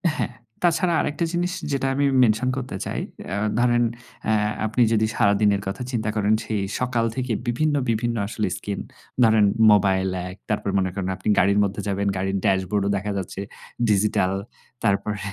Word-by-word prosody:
হ্যাঁ, 120 -5 -2 0.3
তাছাড়া 175 +1 +2
আরেকটা 160 +3 -1
জিনিস 175 +1 0 0.2
যেটা 135 -1 0
আমি 140 +1 +2 0.2
মেনশন 115 +2 +2
করতে 130 -5 -4
চাই। - - -3 0.3
অ্যা 95 - -3 0.2
ধরেন 120 0 +3 0.4
অ্যা 110 - +2 0.3
আপনি 110 +3 0
যদি 110 0 +3
সারাদিনের 100 0 +3
কথা 95 +6 -4
চিন্তা 110 -4 -1
করেন 105 0 +2
সেই 110 -2 -2 0.2
সকাল 125 -2 0
থেকে 125 -2 -1
বিভিন্ন, 145 +5 +1
বিভিন্ন 115 +1 0
আসলে 105 0 -2
স্কিন, 100 -1 -4 0.4
ধরেন 110 -2 +5 0.3
মোবাইল 95 -2 +3 0.2
এক, 90 - -9
তারপর 105 -1 -1
মনে 95 -1 0
করেন 95 -1 -3
আপনি 95 - -8
গাড়ির 100 +2 +3
মধ্যে 100 0 -2
যাবেন, 100 0 -1
গাড়ির 95 +1 -1
ড্যাশবোর্ডও 100 +1 +1
দেখা 105 +2 -3
যাচ্ছে 95 0 -5 0.5
ডিজিটাল 100 -2 +2 0.5
তারপরে 105 +1 0
105 Hz, 160 wpm, -23 LUFS, 100-120 Hz, 0.5 s, ধরেন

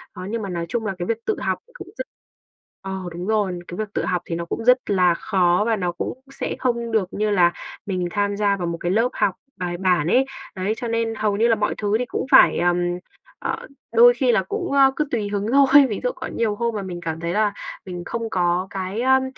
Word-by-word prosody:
Đó, 185 - -7
nhưng 230 +1 -2
mà 200 - -4
nói 170 -1 -3
chung 230 +1 -2
là 195 -2 -2
cái 175 - -3
việc 230 0 -3
tự 435 - +1
học - - -1
cũng - - -10
rất - - -3 0.8
ờ, 195 - -6 0.2
đúng 175 +3 -6
rồi, 205 -5 0
cái 175 - -7
việc 215 -1 -4
tự - - -1
học 180 -1 0
thì 165 - -3
nó 170 0 -4
cũng 225 - -4
rất 250 +1 +7
là 180 -3 +4
khó 180 +1 +2
và 225 - +2
nó 180 -4 -1
cũng 245 +8 -5
sẽ - - -4
không 235 -2 -1
được 215 -4 +1
như 215 +1 0
là 175 -3 +4 0.3
mình 185 -3 -2
tham 205 -1 0
gia 200 -1 +2
vào 175 -2 -3
một 170 - -3
cái 175 - 0
lớp 225 +5 +2
học 190 - +1 0.2
bài 175 -1 -3
bản 180 -4 +2
ấy. 260 +9 +4 0.3
Đấy, 190 +3 -1
cho 240 - -4
nên 230 0 -1
hầu 210 -2 0
như 230 - +3
là 230 - +4
mọi 210 0 -1
thứ 205 0 0
thì 250 - -1
cũng - - -3
phải, - - +7
ờm, 175 0 +2 0.6
ờ, - - -4 0.3
đôi 485 +1 +8
khi - - +2
là - - +2
cũng, 410 -4 -4
ơ, 275 -1 +5
cứ 300 - 0
tùy 215 -4 -1
hứng 205 0 -2
thôi. 275 +1 +7
Ví 210 - -3
dụ - - +2
có - - -6
nhiều 220 -3 -1
hôm 235 0 -1
mà 205 - -2
mình 180 -2 -6
cảm 160 -1 -4
thấy 170 +1 -2
là 210 0 +2 0.3
mình 180 -2 -6
không 230 -1 -3
có 180 0 +1
cái, 195 +3 -4
ờm, 265 +1 +4
205 Hz, 250 wpm, -22 LUFS, 180-230 Hz, 0.8 s, đôi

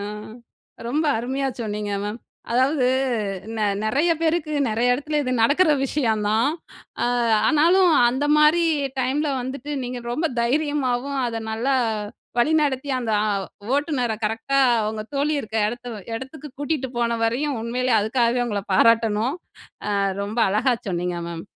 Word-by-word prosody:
அ, - - -4 0.9
ரொம்ப 300 +6 0
அருமையா, 265 +3 -2
சொன்னீங்க 210 -2 -3
மேம். 210 +3 -4 0.3
அதாவது, 260 +2 +2 0.7
நெ - - -3 0.2
நெறைய 285 +10 +2
பேருக்கு, 320 -1 0 0.2
நெறைய 240 +3 +2
எடத்துல, 295 +3 -1
இது 255 - -2
நடக்குற 305 +7 +4
விஷயம் 230 -6 0
தான். 225 +5 +2 0.6
அ, - - +2 0.4
ஆனாலும், 340 +3 +4 0.2
அந்த 260 +4 -1
மாரி 305 +3 +5 0.4
டைம்ல 280 +4 0
வந்துட்டு, 275 +3 -6
நீங்க 245 0 -5
ரொம்ப 320 +6 0
தைரியமாவும், 275 0 0
அத 230 -1 -3
நல்லா 240 +5 0 0.6
வழிநடத்தி, 285 0 +2
அந்த 235 -3 -3 0.2
அ, - - 0 0.5
ஓட்டுநரை 275 -6 -1
கரெக்ட்டா, 225 +6 0 0.3
உங்க 215 0 -4
தோழி 285 +2 +1
இருக்க 220 -2 -6
எடத்த 240 +1 -6 0.3
எடத்துக்கு 270 +5 -7
கூட்டிட்டு 290 -3 -1
போன 235 -1 0
வரையும் 265 +4 0
உண்மையிலே 250 +2 -1
அதுக்காகவே 235 +3 +1
உங்கள 205 -3 -2
பாராட்டணும். 230 - +3 0.6
அ, - - +1 0.3
ரொம்ப 210 +4 -4
அழகா 230 +6 +2
சொன்னீங்க 175 -1 -2
மேம். 170 -1 -6
255 Hz, 135 wpm, -23 LUFS, 225-290 Hz, 0.9 s, மாரி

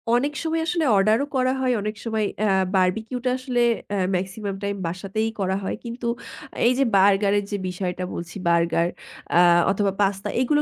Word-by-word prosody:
অনেক 280 +4 +1
সময় 325 0 0
আসলে 335 -3 +1
অর্ডারও 215 +7 +3
করা 255 0 +2
হয়, 255 -1 +2
অনেক 215 +1 -3
সময় 220 -2 0 0.2
আ - - +2 0.3
বারবিকিউটা 220 +7 0
আসলে 255 -2 -1 0.3
আ - - 0 0.2
মেক্সিমাম 195 +2 -3
টাইম 200 0 -1
বাসাতেই 195 +5 -2
করা 190 -1 0
হয়। 190 - -2
কিন্তু 235 0 -5 0.6
এই 250 - +4
যে - - +5
বার্গারের 200 +1 +4
যে 205 - -1
বিষয়টা 180 0 -3
বলছি, 170 -1 -7
বার্গার 170 0 +2 0.5
আ - - +7 0.3
অথবা 200 0 +1
পাস্তা 195 0 0
এগুলো 295 +4 +2
205 Hz, 165 wpm, -23 LUFS, 190-245 Hz, 0.6 s, আ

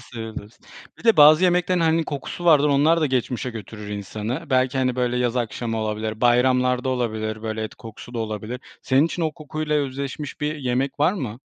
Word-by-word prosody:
sevebilirsin. 115 -3 -9 0.3
Bir - - -16
de 225 -1 +5
bazı 155 +3 +8
yemeklerin 180 0 +2
hani 165 0 +2
kokusu 145 +4 -6
vardır, 150 -3 +5
onlar 150 +4 +3
da 155 - +3
geçmişe 125 -1 -1
götürür 105 -2 -8
insanı. 105 +4 -4
Belki, 130 0 +2
hani, 130 -1 0
böyle, 125 -1 0
yaz 125 0 0
akşamı 115 -1 -2
olabilir, 110 0 -3
bayramlarda 125 +1 +3
olabilir, 110 -3 -2
böyle, 110 0 -3
et - - -7
kokusu 115 +2 -11
da - - -2
olabilir. 110 +2 -4 0.2
Senin 135 +4 +3
için 170 - -4
o 160 -1 0
kokuyla 155 -1 -4
özdeşmiş 140 +1 -4
bir 150 +1 -1
yemek 130 +1 -2
var 160 +5 +4
mı? 125 - -5
125 Hz, 180 wpm, -23 LUFS, 115-150 Hz, 0.3 s, bazı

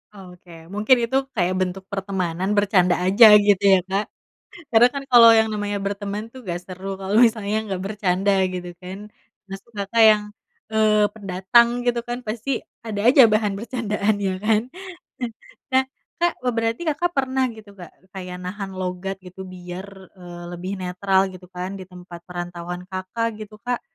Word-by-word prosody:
Oke 180 -2 -14 0.2
mungkin 215 +5 +3
itu 250 +3 +1 0.2
kayak 185 -3 +1
bentuk 185 +1 -2
pertemanan 190 -2 -2
bercanda 190 -3 +3
aja 200 +5 +7
gitu 205 -2 +4
ya 190 - +6
Kak, 200 +2 0 0.7
karena 235 +1 +7
kan 280 - -4
kalau 235 -1 +9
yang 220 0 +3
namanya 205 -1 -2
berteman 200 +1 -3
tuh 260 - -11
gak 175 0 -2
seru 190 +1 -6
kalau 195 +3 0
misalnya 220 -3 +3
nggak 190 -2 -3
bercanda 195 -1 0 0.2
gitu 180 -1 -5
kan 185 +1 -8 0.5
maksud 195 +4 -9
Kakak 205 +3 +2
yang, 210 -1 +1 0.5
eee, 215 -1 +3
pendatang 200 +3 +3 0.2
gitu 245 -1 +1
kan 240 0 -3
pasti 230 +4 -5 0.4
ada 205 -2 -3
aja 275 - +7
bahan 215 -1 +1
bercandaan 215 -3 -1
ya 190 - 0
kan, 215 +1 +2 1.1
nah 260 0 +4 0.4
Kak 345 0 +3
be 250 - +1
berarti 230 +4 -1
Kakak 350 +4 -1
pernah 265 -1 +1
gitu 215 -2 -13
Kak 175 - -11 0.2
kayak 180 -2 -7
nahan 195 +2 -5
logat 185 +1 -4
gitu 180 +1 -12
biar, 180 +1 -8 0.3
eee, 175 -1 -10
lebih 180 +2 -5
netral 190 +1 0
gitu 185 0 -12
kan 180 +1 -4
di - - -7
tempat 180 -1 -11
perantauan 175 0 -6
Kakak 190 +5 -2
gitu 215 0 -9
Kak, 245 -1 -1
200 Hz, 160 wpm, -22 LUFS, 185-220 Hz, 1.1 s, kalau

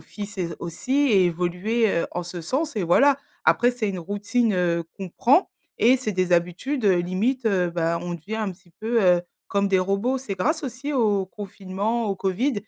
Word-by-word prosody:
fils 205 0 -8
et 185 - -1
s 170 -1 -4
aussi, 170 +10 -5 0.2
et 190 -3 +5
évoluer, 180 +7 0
heu, - - -3
en 175 - -3
ce 175 0 -6
sens 270 - -2
et 200 - 0
voilà. 275 +12 +4 0.3
Après, 245 +1 +4
c'est 240 -4 -2
une 190 -2 -3
routine, 205 +5 0
heu, 170 -2 +1
qu'on 190 -2 -6
prend 270 - +3 0.3
et 250 +3 +5
c'est 220 -5 -3
des 185 -1 0
habitudes, 180 - 0
heu, 190 -3 +5
limite, 220 +8 -1
heu, 180 -4 +2
bah, 170 0 0
on 175 0 -4
devient 185 +7 -6
un 215 -3 -2
petit 180 -2 -16
peu, 230 +1 +1
heu, 175 -1 +4 0.3
comme 200 0 +1
des 190 -1 +3
robots. 200 +8 0
C'est 220 -7 -5
grâce 310 - 0
aussi 270 +3 -5
au 210 -7 +2
confinement, 200 +3 -3
au 200 - 0
Covid, 200 +9 0
200 Hz, 205 wpm, -24 LUFS, 180-240 Hz, 0.3 s, et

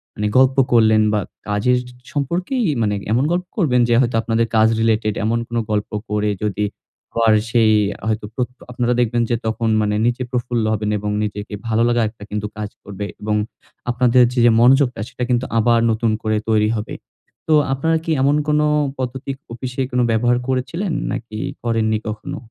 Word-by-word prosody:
মানে 105 - -1
গল্প 130 0 +4 0.2
করলেন 110 -2 +5
বা 105 - +2 0.3
কাজের 105 +5 +2 0.3
সম্পর্কেই 180 - -1 0.2
মানে 105 -2 +1 0.2
এমন 120 +4 +2
গল্প 180 +1 -2
করবেন 130 - +3
যে - - +4
হয়তো 120 -2 0
আপনাদের 115 0 +1
কাজ 110 0 +5
রিলেটেড। 110 -1 +1
এমন 115 +2 +1
কোন 120 - -4
গল্প 105 -1 -1 0.2
করে 105 0 0 0.2
যদি 105 0 -1 0.5
পর 115 -1 +4 0.2
সেই 115 -2 +4 0.4
হয়তো 110 -1 -1
প্রত 125 +1 -2 0.2
আপনারা 125 0 0
দেখবেন 120 0 +1
যে 120 - +2
তখন 110 +1 -1
মানে 105 0 0
নিচে 120 +1 0
প্রফুল্ল 120 -2 -1
হবেন 105 -1 -2
এবং 105 +1 -3
নিজেকে 105 0 -5
ভালো 115 0 +1
লাগা 120 0 +2
একটা 110 -1 -14
কিন্তু 105 0 -3
কাজ 105 -1 -4
করবে 100 0 -6 0.2
এবং 105 0 -1 0.5
আপনাদের 125 0 +4
যে 120 -1 +4
মনোযোগটা 130 -1 +4
সেটা 125 - -5
কিন্তু 125 0 +1
আবার 115 +1 +4
নতুন 110 0 0
করে 110 -1 +1
তৈরি 105 -1 +3
হবে। 105 -1 -4 0.5
তো 160 - +3 0.2
আপনারা 160 +5 +1
কি 165 - -2
এমন 140 +2 +3
কোন 150 0 +2 0.4
পদ্ধতির 130 +1 -4 0.2
অফিসে 125 +2 -4
কোনো 125 0 +2
ব্যবহার 120 +2 +2
করেছিলেন? 160 +9 -2 0.2
নাকি 110 -2 -5 0.3
করেননি 110 -2 +1
কখনো? 110 0 -5
115 Hz, 170 wpm, -20 LUFS, 110-125 Hz, 0.5 s, করলেন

